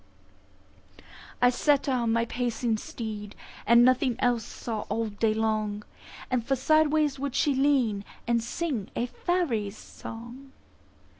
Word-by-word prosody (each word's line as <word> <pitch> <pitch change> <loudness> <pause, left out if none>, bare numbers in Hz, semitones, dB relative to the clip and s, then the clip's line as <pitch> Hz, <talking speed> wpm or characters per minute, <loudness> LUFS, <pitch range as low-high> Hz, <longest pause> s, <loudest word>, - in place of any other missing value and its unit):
I 245 - +7
set 285 +2 +2
her 270 - 0
on 235 -3 +1
my 230 0 +2
pacing 235 -1 -1
steed, 210 -3 -6 0.3
And 235 +2 +7
nothing 255 -1 +3
else 245 -3 +1
saw 225 0 -5
all 220 +2 -1
day 215 +1 0
long; 215 -1 -1 0.6
For 270 +4 +1
sideways 305 +1 +2
would 280 -2 -3
she 290 - +3
lean, 260 -7 +2 0.2
and 235 -1 +1
sing 250 - -3
A 240 - 0
faery's 240 - -1
song. 240 +4 -10
235 Hz, 130 wpm, -27 LUFS, 220-270 Hz, 0.6 s, I